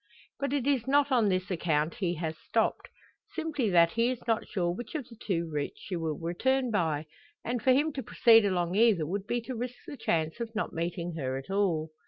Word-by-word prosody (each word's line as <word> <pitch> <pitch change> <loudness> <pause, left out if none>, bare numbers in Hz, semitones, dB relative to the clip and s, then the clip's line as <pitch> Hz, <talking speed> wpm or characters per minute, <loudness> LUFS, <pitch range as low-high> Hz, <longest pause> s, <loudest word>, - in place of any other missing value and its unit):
But 280 -1 -1
it 280 -3 0
is 265 -4 +1
not 285 +1 +3
on 235 -5 +4
this 185 +1 -1
account 160 -2 0
he 175 -3 -1
has 160 -1 -3
stopped; - - -1 0.5
simply 310 -8 -1
that 170 -2 +5
he 230 +4 +2
is 255 - -1
not 225 -2 0
sure 180 -5 0
which 235 - -7
of 285 -6 -3
the 235 - -13
two 180 -6 -2
routes 150 -2 -4
she 190 - -5
will 160 -3 -2
return 250 +10 0
by 160 -7 0 0.4
and 240 -1 -1
for 260 - +4
him 290 +4 +3
to 270 - -3
proceed 225 -1 +5
along 180 -3 0
either 205 -6 +4
would 195 +5 -3
be 240 0 0
to 255 +3 -6
risk 245 +1 -4
the - - -7
chance 160 -4 -1
of 230 -1 -5
not - - -2
meeting 170 +1 -3
her 130 -3 -2
at 135 +7 -8
all. 170 -6 +1
200 Hz, 220 wpm, -29 LUFS, 170-245 Hz, 0.5 s, that